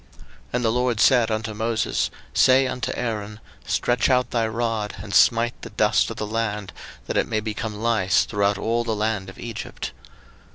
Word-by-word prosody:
02:008:016 - - -29 0.4
And 125 -1 0
the 110 - +3
LORD 125 -1 0
said 120 -2 +5
unto 110 0 -2
Moses, 110 +1 0 0.2
Say 130 +1 +5
unto 125 -2 -2
Aaron, 105 -3 -4 0.3
Stretch 120 +2 +1
out 125 -1 +2
thy 115 -2 +1
rod, 115 -2 -2
and 100 -1 -7
smite 115 +3 +4
the - - -7
dust 105 -1 +2
of 115 - -7
the 110 - -2
land, 105 -3 -3 0.3
that - - -2
it - - +2
may 110 - 0
become 110 0 -4
lice 110 -5 +2
throughout 100 -1 +1
all 115 +3 0
the 115 -2 -1
land 105 -2 -1
of 95 - -12
Egypt. 115 -2 -6
110 Hz, 180 wpm, -23 LUFS, 105-120 Hz, 0.4 s, said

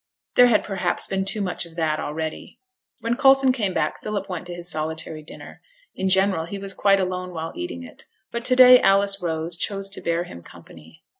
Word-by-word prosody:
There 245 - +7
had 225 -3 +3
perhaps 190 -3 -2
been 190 0 -2
too 205 +2 0
much 185 -3 -3
of 170 -1 -14
that 160 -2 -1
already. 155 +1 -5 0.4
When 230 +1 -1
Coulson 270 0 +5
came 215 -7 -1
back - - -2
Philip 205 -2 -4
went 180 -2 -6
to 175 - -6
his 175 0 -6
solitary 155 0 -4
dinner. 150 - -12 0.3
In 190 0 -2
general 190 -3 +2
he 200 +4 -6
was 195 0 -3
quite 195 0 +3
alone 185 -1 -3
while 160 0 -5
eating 85 -1 -6
it; - - -13 0.3
but 235 0 -4
to 255 - +3
day 250 0 +9
Alice 195 0 +3
Rose 165 0 -2
chose 195 +2 -3
to - - -5
bear 170 0 -1
him 85 - -11
company. 80 -1 -16
185 Hz, 205 wpm, -23 LUFS, 160-200 Hz, 0.4 s, day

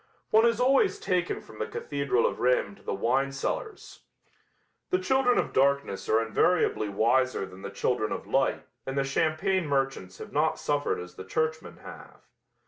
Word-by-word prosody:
One 220 +2 +6
is 230 0 +1
always 270 - +3
taken 180 -2 -1
from 110 - -14
the 110 - -2
cathedral 140 -4 -1
of - - -1
Rheims 125 -5 +1
to - - -21
the - - -4
wine 130 +7 +1
cellars. 425 - -5 0.9
The 370 - +2
children 265 -8 +2
of - - 0
darkness 140 -6 +1
are 110 +1 +3
invariably 115 -2 +1
wiser 120 +2 +1
than 95 0 -13
the 100 - -6
children 110 +2 -1
of - - -4
light - - 0 0.2
and 135 +1 -3
the 140 - +2
champagne 160 +6 0
merchants 135 -10 -1
have - - -10
not 155 +2 +1
suffered 145 0 -1
as 90 0 -9
the - - -7
churchmen 160 +9 -2
have. - - -12
140 Hz, 170 wpm, -28 LUFS, 110-175 Hz, 0.9 s, One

